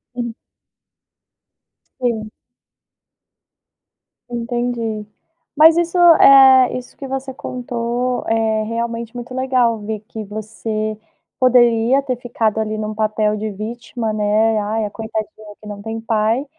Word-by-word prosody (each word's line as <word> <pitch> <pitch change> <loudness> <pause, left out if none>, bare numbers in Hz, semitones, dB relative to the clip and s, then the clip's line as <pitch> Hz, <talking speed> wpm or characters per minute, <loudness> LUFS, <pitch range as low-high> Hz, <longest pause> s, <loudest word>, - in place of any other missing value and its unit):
Sim. 235 -2 -4 1.7
Sim. 220 -3 -2 2.0
Entendi, 235 -2 -3 0.5
mas 320 +2 +7
isso 345 +1 0
é, 270 -6 +7
isso 250 -1 -10
que 275 - -7
você 265 0 -4
contou 245 0 -3
é 220 -1 +1
realmente 230 +1 -4
muito 245 +1 -7
legal 255 -3 +1
ver 215 0 -5
que 220 -1 -7
você 215 +1 -4 0.4
poderia 245 0 +4
ter 265 -2 -2
ficado 225 -3 -1
ali 215 0 -2
num 215 0 -4
papel 215 0 0
de 215 0 -4
vítima, 225 +2 -5
né, 215 +1 +2
"Ai 215 +1 -1
a - - -4
Coitadinha 215 -1 -6
que 215 - -12
não 205 -1 -7
tem 225 +1 -5
pai", 225 +3 0
225 Hz, 120 wpm, -19 LUFS, 215-250 Hz, 2.0 s, mas